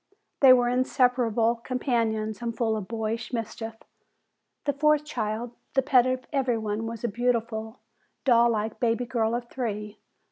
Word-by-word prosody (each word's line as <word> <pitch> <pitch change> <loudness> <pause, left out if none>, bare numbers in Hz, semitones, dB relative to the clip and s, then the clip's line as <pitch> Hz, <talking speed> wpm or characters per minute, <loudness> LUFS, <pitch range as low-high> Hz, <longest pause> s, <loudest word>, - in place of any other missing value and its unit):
They 265 -2 +8
were 245 -1 +5
inseparable 245 -2 +2
companions, 230 -3 -1
and 230 -1 -4
full 225 -2 +1
of 210 -3 -5
boyish 225 +1 -3
mischief. 225 0 -4 0.9
The 285 - +1
fourth 300 +1 +2
child, 230 -4 -3 0.2
the 270 - +4
pet 250 -1 +4
of 255 0 -2
everybody, 225 -6 0
was 225 0 -5
a - - +1
beautiful, 230 0 -2 0.4
doll 235 -2 +5
like 220 -1 -2
baby 235 +1 +1
girl 230 -1 0
of 240 - -2
three, 260 - -8
whose - - -6
name 210 0 -6
was 210 - -18
Helen. - - -45
235 Hz, 170 wpm, -26 LUFS, 220-250 Hz, 0.9 s, They